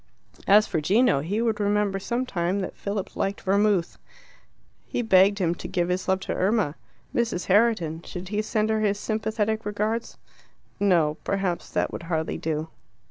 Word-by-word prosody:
As 210 Hz, +2 st, +7 dB
for 160 Hz, -5 st, -2 dB
Gino, 210 Hz, -, +3 dB
he 200 Hz, +10 st, -1 dB
would 225 Hz, -3 st, 0 dB
remember 205 Hz, -1 st, +1 dB
some 240 Hz, +6 st, -2 dB
time 185 Hz, -3 st, -1 dB
that 185 Hz, -, -5 dB
Philip 200 Hz, -1 st, -4 dB
liked 195 Hz, +1 st, -2 dB
vermouth. 200 Hz, -2 st, +1 dB, 0.9 s
He 245 Hz, -, -2 dB
begged 200 Hz, -1 st, +5 dB
him 175 Hz, -4 st, +1 dB
to -, -, -8 dB
give 175 Hz, -2 st, -1 dB
his 180 Hz, +1 st, -1 dB
love 190 Hz, 0 st, +1 dB
to -, -, -3 dB
Irma. 195 Hz, -5 st, +1 dB, 0.4 s
Mrs. 230 Hz, -7 st, -1 dB
Herriton 195 Hz, -6 st, +2 dB
should 180 Hz, 0 st, -7 dB
he 210 Hz, +1 st, 0 dB
send 215 Hz, 0 st, 0 dB
her 220 Hz, -, +1 dB
his 205 Hz, -1 st, +1 dB
sympathetic 220 Hz, 0 st, -1 dB
regards? 215 Hz, +3 st, -2 dB, 0.6 s
No; 170 Hz, -7 st, +3 dB
perhaps 195 Hz, -3 st, -2 dB
that -, -, -1 dB
would -, -, -5 dB
hardly 160 Hz, -2 st, -2 dB
do. 155 Hz, 0 st, -2 dB
200 Hz, 165 wpm, -25 LUFS, 180-215 Hz, 0.9 s, As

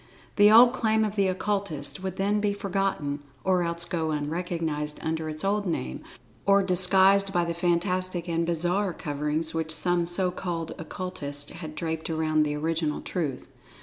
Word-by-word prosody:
The 205 Hz, 0 st, +7 dB
old 240 Hz, +3 st, +8 dB
claim 220 Hz, -3 st, +2 dB
of 210 Hz, -1 st, -4 dB
the 200 Hz, -2 st, +2 dB
Occultists 190 Hz, -5 st, -2 dB
would 190 Hz, -1 st, -4 dB
then 205 Hz, +2 st, +1 dB
be 205 Hz, -1 st, 0 dB
forgotten 195 Hz, -8 st, -2 dB, 0.2 s
or 185 Hz, -1 st, +2 dB
else 170 Hz, 0 st, -1 dB
go 165 Hz, -3 st, -2 dB
unrecognized 155 Hz, -1 st, -3 dB
under 160 Hz, 0 st, -2 dB
its 155 Hz, 0 st, -1 dB
old 200 Hz, 0 st, 0 dB
name; 65 Hz, -, -3 dB, 0.4 s
or 200 Hz, 0 st, +4 dB
disguised 190 Hz, +2 st, +4 dB
by 175 Hz, -2 st, +1 dB
the 170 Hz, -, -2 dB
fantastic 180 Hz, +1 st, -1 dB
and 170 Hz, 0 st, 0 dB
bizarre 175 Hz, +3 st, 0 dB
coverings 150 Hz, +1 st, -2 dB
which 160 Hz, -1 st, -2 dB
some 175 Hz, +1 st, +3 dB
so 180 Hz, +1 st, +1 dB
called 170 Hz, -3 st, -4 dB
Occultists 145 Hz, -5 st, -6 dB
had 160 Hz, -2 st, -8 dB
draped 160 Hz, 0 st, -3 dB
around 155 Hz, -1 st, +1 dB
the 150 Hz, -1 st, 0 dB
original 160 Hz, 0 st, -1 dB
Truth. 150 Hz, -8 st, -4 dB
175 Hz, 160 wpm, -26 LUFS, 160-195 Hz, 0.4 s, old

